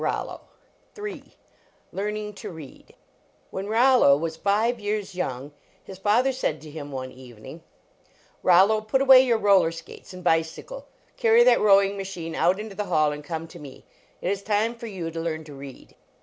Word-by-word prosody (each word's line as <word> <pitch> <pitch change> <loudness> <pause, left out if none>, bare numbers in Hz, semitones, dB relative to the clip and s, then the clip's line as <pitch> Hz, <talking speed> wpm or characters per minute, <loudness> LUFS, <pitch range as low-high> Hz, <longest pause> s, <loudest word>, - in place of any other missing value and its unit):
ROLLO - - -3 1.5
LEARNING 210 +1 -4
TO 195 - -8
READ 160 -6 -13 0.6
III 190 - -3
IIKX - - -7
Rollo 235 - +5
was 160 +1 -4
five 215 +7 0
years 205 -1 -3
young, 140 -5 -4 0.3
his 190 -1 -11
father 225 +7 +2
said 250 - -2
to 155 +1 -12
him 145 -2 -8
one 130 -1 -6
evening: 125 +4 -12 0.4
" - - -34
Rollo, 195 +5 +4
put 215 +5 0
away 265 -1 +8
your 240 -3 +2
roller 200 -6 +4
skates 165 - -11
and 180 -1 -10
bicycle, 165 - -1 0.3
carry 465 0 +5
that - - +4
rowing 200 -1 +4
machine 180 -4 -6
out 185 +3 +1
into 215 -1 -7
the 205 +1 -4
hall, 155 -4 +2
and 150 0 -7
come 165 +1 -5
to 175 - -12
me. 140 -4 -12 0.4
It 180 - 0
is 200 -1 -3
time 215 +3 0
for 235 0 -9
you 180 -6 -5
to 165 - -6
learn 160 -1 -3
to 150 -1 -12
read 135 -1 -12
190 Hz, 175 wpm, -24 LUFS, 160-215 Hz, 1.5 s, away